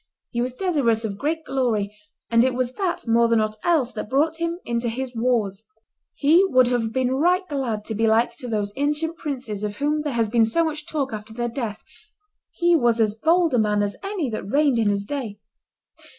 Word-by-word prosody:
He 235 Hz, -, -1 dB
was 250 Hz, +1 st, -2 dB
desirous 255 Hz, -, +1 dB
of 200 Hz, -2 st, -5 dB
great 320 Hz, +3 st, -1 dB
glory, 220 Hz, -6 st, -1 dB, 0.4 s
and 230 Hz, 0 st, +5 dB
it 255 Hz, -1 st, +1 dB
was 250 Hz, -1 st, -1 dB
that 360 Hz, -7 st, -2 dB
more 235 Hz, +1 st, +4 dB
than 230 Hz, -1 st, +3 dB
ought 215 Hz, 0 st, -1 dB
else 310 Hz, -8 st, +2 dB
that 215 Hz, -, -6 dB
brought 310 Hz, +4 st, +1 dB
him 335 Hz, 0 st, -2 dB
into 235 Hz, 0 st, -1 dB
his 255 Hz, +2 st, -4 dB
wars; 225 Hz, -4 st, 0 dB, 0.5 s
he 320 Hz, +6 st, +5 dB
would 255 Hz, -9 st, +4 dB
have 235 Hz, -3 st, 0 dB
been 255 Hz, +1 st, 0 dB
right 360 Hz, +7 st, +2 dB
glad 245 Hz, -, -3 dB
to 220 Hz, -, -4 dB
be 225 Hz, +1 st, +1 dB
like 225 Hz, +2 st, +2 dB
to 255 Hz, -, -7 dB
those 205 Hz, -3 st, -2 dB
ancient 300 Hz, +3 st, 0 dB
princes 250 Hz, -9 st, -4 dB
of 205 Hz, -1 st, -3 dB
whom 300 Hz, +2 st, 0 dB
there 295 Hz, -2 st, -3 dB
has 230 Hz, -2 st, +1 dB
been 230 Hz, +1 st, +3 dB
so 330 Hz, +10 st, +2 dB
much 305 Hz, 0 st, -4 dB
talk 280 Hz, -6 st, -2 dB
after 215 Hz, +1 st, -7 dB
their 240 Hz, 0 st, -2 dB
death; 230 Hz, -4 st, -5 dB, 0.7 s
he 345 Hz, -1 st, +2 dB
was 240 Hz, -6 st, +2 dB
as 215 Hz, -2 st, +3 dB
bold 330 Hz, +7 st, +2 dB
a 245 Hz, -, +3 dB
man 210 Hz, -1 st, +2 dB
as 205 Hz, 0 st, -2 dB
any 390 Hz, -7 st, -2 dB
that 215 Hz, -2 st, -5 dB
reigned 280 Hz, -2 st, +3 dB
in 215 Hz, -2 st, +2 dB
his 200 Hz, 0 st, 0 dB
day. 230 Hz, -4 st, -5 dB
245 Hz, 210 wpm, -23 LUFS, 220-300 Hz, 0.7 s, and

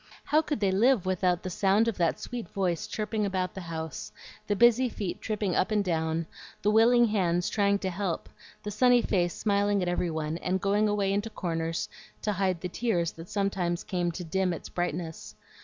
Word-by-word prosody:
How 305 Hz, +1 st, +3 dB
could 300 Hz, -5 st, -3 dB
they 195 Hz, -2 st, +3 dB
live 225 Hz, +1 st, +3 dB
without 180 Hz, -1 st, +1 dB
the 185 Hz, -, -4 dB
sound 200 Hz, +5 st, +3 dB
of 230 Hz, -, 0 dB
that 170 Hz, -1 st, +1 dB
sweet 240 Hz, -7 st, -6 dB
voice 180 Hz, -4 st, -1 dB
chirping 215 Hz, 0 st, -2 dB
about 190 Hz, -2 st, -1 dB
the 190 Hz, -, -6 dB
house, 160 Hz, -10 st, -6 dB, 0.4 s
the 205 Hz, -, +1 dB
busy 240 Hz, +3 st, +5 dB
feet 200 Hz, -5 st, -4 dB
tripping 210 Hz, -4 st, -1 dB
up -, -, +2 dB
and 210 Hz, -2 st, +1 dB
down, 160 Hz, -1 st, 0 dB, 0.4 s
the 210 Hz, -, +3 dB
willing 235 Hz, +2 st, +6 dB
hands 175 Hz, -4 st, +1 dB
trying 200 Hz, -1 st, +2 dB
to 190 Hz, -1 st, -3 dB
help, 180 Hz, -2 st, -3 dB, 0.4 s
the 210 Hz, -, -4 dB
sunny 245 Hz, +3 st, +4 dB
face 175 Hz, -3 st, +1 dB
smiling 205 Hz, -1 st, +1 dB
at -, -, -2 dB
every 175 Hz, 0 st, 0 dB
one, 160 Hz, 0 st, -3 dB
and 185 Hz, +1 st, -1 dB
going 205 Hz, +3 st, +2 dB
away 200 Hz, -1 st, +1 dB
into 205 Hz, +3 st, -1 dB
corners 165 Hz, -4 st, -2 dB, 0.4 s
to 210 Hz, -, +1 dB
hide 185 Hz, -3 st, 0 dB
the 180 Hz, -, -2 dB
tears 175 Hz, -5 st, 0 dB
that 165 Hz, +1 st, -11 dB
sometimes 190 Hz, -4 st, -1 dB
came 175 Hz, -2 st, -1 dB
to 180 Hz, -, -5 dB
dim 180 Hz, +2 st, 0 dB
its 165 Hz, -, -7 dB
brightness? 170 Hz, -2 st, -4 dB
190 Hz, 195 wpm, -28 LUFS, 175-210 Hz, 0.4 s, willing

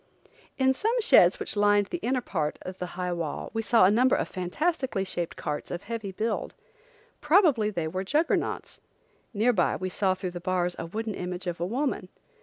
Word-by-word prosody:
In 265 Hz, -1 st, +3 dB
some 445 Hz, -, 0 dB
sheds 470 Hz, +2 st, +5 dB
which 425 Hz, -, -2 dB
lined 205 Hz, 0 st, +4 dB
the 350 Hz, -, -2 dB
inner 255 Hz, -3 st, 0 dB
part 155 Hz, -9 st, -2 dB
of 185 Hz, 0 st, -8 dB
the 180 Hz, -, -3 dB
high 180 Hz, -1 st, -1 dB
wall 165 Hz, -3 st, -4 dB
we 225 Hz, -, -1 dB
saw 225 Hz, -3 st, +5 dB
a 190 Hz, -, +5 dB
number 250 Hz, +4 st, +4 dB
of -, -, -1 dB
fantastically 240 Hz, -, -1 dB
shaped 175 Hz, -3 st, -4 dB
carts 150 Hz, -, -4 dB
of 175 Hz, +2 st, -5 dB
heavy 215 Hz, -2 st, -5 dB
build. 220 Hz, +3 st, -3 dB, 0.7 s
Probably 300 Hz, -, +4 dB
they 170 Hz, -6 st, -2 dB
were 185 Hz, +4 st, -3 dB
juggernauts. 300 Hz, -, -1 dB, 0.5 s
Near 235 Hz, +2 st, +2 dB
by 180 Hz, -5 st, +2 dB
we 185 Hz, -, -3 dB
saw 190 Hz, 0 st, +1 dB
through 185 Hz, -1 st, -4 dB
the 175 Hz, -, -6 dB
bars 180 Hz, -1 st, -1 dB
a 165 Hz, -, -4 dB
wooden 220 Hz, +4 st, -4 dB
image 180 Hz, 0 st, -5 dB
of 175 Hz, -2 st, -3 dB
a 175 Hz, -, -1 dB
woman. 245 Hz, -4 st, -2 dB
200 Hz, 195 wpm, -27 LUFS, 180-245 Hz, 0.7 s, sheds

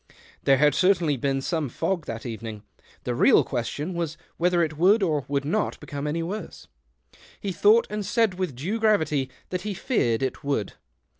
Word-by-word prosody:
There 135 Hz, -1 st, +5 dB
had 150 Hz, +1 st, +4 dB
cer 190 Hz, +6 st, +4 dB
tainly 150 Hz, -8 st, -1 dB
been 135 Hz, -1 st, 0 dB
some 155 Hz, -1 st, -1 dB
fog 165 Hz, +6 st, -2 dB
that 115 Hz, 0 st, -5 dB
evening; 110 Hz, -2 st, -6 dB, 0.4 s
the 125 Hz, -, -2 dB
real 120 Hz, -, +5 dB
question 145 Hz, +7 st, -3 dB
was 165 Hz, -2 st, -3 dB, 0.2 s
whether 175 Hz, 0 st, +2 dB
it 155 Hz, -1 st, -3 dB
w^ould 195 Hz, +3 st, +5 dB
or 150 Hz, -4 st, -1 dB
would 140 Hz, 0 st, -1 dB
not 210 Hz, +9 st, -1 dB
become 145 Hz, 0 st, -5 dB
any 165 Hz, +3 st, -1 dB
worse. 200 Hz, +6 st, -6 dB, 0.7 s
He 200 Hz, -, -3 dB
thought 210 Hz, +6 st, +5 dB
and 210 Hz, 0 st, -3 dB
said 210 Hz, -3 st, +1 dB
with 180 Hz, -8 st, -2 dB
due 185 Hz, -, -3 dB
gravity, 155 Hz, -11 st, +2 dB, 0.2 s
that 180 Hz, -1 st, -2 dB
he 210 Hz, -2 st, -4 dB
feared 135 Hz, -, 0 dB
it 130 Hz, +3 st, -3 dB
would. 140 Hz, -8 st, -1 dB
160 Hz, 180 wpm, -25 LUFS, 135-190 Hz, 0.7 s, There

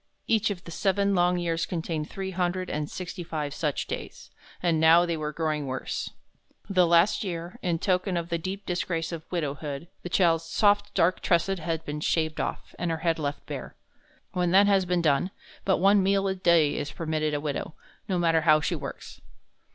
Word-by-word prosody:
Each 220 Hz, -1 st, +2 dB
of 190 Hz, -4 st, -5 dB
the 170 Hz, -, -9 dB
seven 200 Hz, +2 st, +1 dB
long 180 Hz, -1 st, +3 dB
years 165 Hz, -1 st, -1 dB
contained 165 Hz, -3 st, -3 dB
three 190 Hz, -1 st, -5 dB
hundred 180 Hz, 0 st, -1 dB
and 150 Hz, 0 st, -2 dB
sixty 180 Hz, 0 st, -6 dB
five 150 Hz, -3 st, -4 dB
such 150 Hz, -3 st, -1 dB
days, -, -, -7 dB, 0.3 s
and 170 Hz, -3 st, +1 dB
now 165 Hz, +2 st, +6 dB
they 170 Hz, -1 st, -1 dB
were 150 Hz, -1 st, -3 dB
growing 155 Hz, -2 st, -2 dB
worse. 130 Hz, 0 st, -3 dB, 0.6 s
The 185 Hz, -3 st, +3 dB
last 170 Hz, +6 st, +4 dB
year, 170 Hz, -2 st, -5 dB
in 175 Hz, -2 st, 0 dB
token 185 Hz, +1 st, 0 dB
of 170 Hz, 0 st, -3 dB
the 170 Hz, -1 st, -1 dB
deep 190 Hz, +4 st, -5 dB
disgrace 175 Hz, -2 st, -2 dB
of 165 Hz, -1 st, -8 dB
widowhood, 150 Hz, -1 st, -3 dB
the 175 Hz, -, -6 dB
child's 165 Hz, -2 st, +3 dB
soft 205 Hz, +3 st, +2 dB
dark 180 Hz, +2 st, +2 dB
tresses 180 Hz, +2 st, +1 dB
had 160 Hz, 0 st, -3 dB
been 150 Hz, +1 st, -4 dB
shaved 155 Hz, 0 st, 0 dB
off, -, -, -5 dB
and 175 Hz, -, -1 dB
her 165 Hz, -, -1 dB
head 165 Hz, -1 st, +2 dB
left 145 Hz, -1 st, -3 dB
bare. -, -, -7 dB, 0.6 s
When 180 Hz, -1 st, 0 dB
that 195 Hz, +3 st, +6 dB
has 195 Hz, -2 st, +3 dB
been 180 Hz, -1 st, 0 dB
done, 150 Hz, +3 st, +2 dB, 0.4 s
but 190 Hz, -, +3 dB
one 195 Hz, +3 st, +5 dB
meal 195 Hz, +1 st, +2 dB
a 190 Hz, -, +1 dB
day 170 Hz, -5 st, +3 dB
is 145 Hz, 0 st, -3 dB
permitted 155 Hz, -2 st, -1 dB
a -, -, 0 dB
widow, 150 Hz, +1 st, -4 dB, 0.3 s
no 185 Hz, -, 0 dB
matter 165 Hz, -2 st, +3 dB
how 155 Hz, -1 st, +5 dB
she 150 Hz, -, -1 dB
works. -, -, -7 dB
170 Hz, 195 wpm, -27 LUFS, 160-185 Hz, 0.6 s, now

